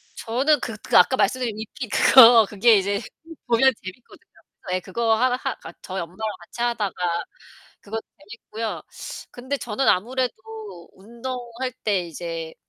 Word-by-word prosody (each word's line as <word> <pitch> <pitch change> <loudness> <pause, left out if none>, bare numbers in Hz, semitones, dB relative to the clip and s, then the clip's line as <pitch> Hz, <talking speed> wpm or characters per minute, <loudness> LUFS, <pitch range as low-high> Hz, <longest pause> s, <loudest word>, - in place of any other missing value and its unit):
저는 265 +5 +1
그 225 -3 -5
그 - - +3
아까 260 - +5
말씀드린 250 -4 0
위핏 225 +2 -7
그거 235 -3 +8
그게 215 +1 +4
이제 200 +1 0 0.5
보면 240 +3 +4
재밌거든요. 190 +6 -12 0.4
예 185 - +1
그거 225 +4 0
하 250 +3 +2
하 - - 0 0.2
그니까 - - -12
저희 190 -1 -5
엄마랑 170 +2 -9 0.2
같이 235 +7 -10
하다가 235 -5 -1 0.9
그거 220 +2 -5 0.2
재밌고요. 220 +2 -7 0.5
근데 260 +3 -4
저는 245 +1 -2
아무래도 250 +6 +1 0.6
운동할 240 +3 -6
때 205 -3 +2
이제 165 -1 -6
230 Hz, 300 characters per minute, -23 LUFS, 200-250 Hz, 0.9 s, 그거